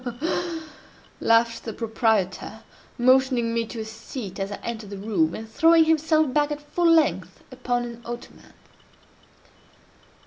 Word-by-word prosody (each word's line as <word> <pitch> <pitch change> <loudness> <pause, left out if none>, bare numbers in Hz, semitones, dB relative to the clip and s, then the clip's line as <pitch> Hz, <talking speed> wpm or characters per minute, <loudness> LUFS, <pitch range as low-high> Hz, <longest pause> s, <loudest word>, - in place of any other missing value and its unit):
"Ha! 250 - -3
ha! 240 - -10
ha!—ha! 325 +4 -1
ha! 340 -2 -2
ha!"—laughed 230 -6 -1
the 225 - -5
proprietor, 220 -2 -1 0.3
motioning 255 -2 +3
me 230 -1 -1
to 225 0 -6
a - - -5
seat 220 -2 -8
as 195 +1 -3
I - - -3
entered 225 -3 -5
the 200 - -7
room, 190 -6 0
and 220 - -7
throwing 325 +8 +5
himself 315 -3 +2
back 295 0 +2
at 295 -1 -4
full 335 +4 0
length 325 -1 +1
upon 245 -1 -2
an 235 0 -9
ottoman. 240 +1 -9
235 Hz, 160 wpm, -24 LUFS, 220-295 Hz, 0.3 s, throwing